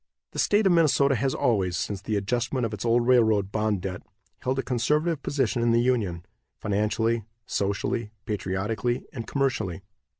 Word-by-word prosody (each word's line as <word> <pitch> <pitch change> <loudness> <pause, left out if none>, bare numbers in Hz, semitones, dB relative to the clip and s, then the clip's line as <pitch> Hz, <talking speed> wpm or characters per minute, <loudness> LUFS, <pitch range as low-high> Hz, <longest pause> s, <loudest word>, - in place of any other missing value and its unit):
The - - -6
State 210 +1 +3
of 190 - +5
Minnesota 150 -5 +4
has 130 +2 0
always, 95 -7 +1
since 100 +2 -3
the 105 +1 -2
adjustment 120 +5 0
of 110 - -4
its 100 - -5
old 120 0 +3
railroad 110 -6 +3
bond 105 -3 0
debt, 90 -2 -4 0.4
held 130 +1 -1
a 135 - 0
conservative 150 +6 0
position 130 -5 0
in 115 0 +3
the 115 - +4
Union, 105 -9 0 0.3
financially, 110 +2 0 0.2
socially, 100 +3 -1 0.2
patriotically 105 +3 -2
and 115 -3 -6
commercially. 120 - -1
115 Hz, 160 wpm, -26 LUFS, 100-130 Hz, 0.4 s, of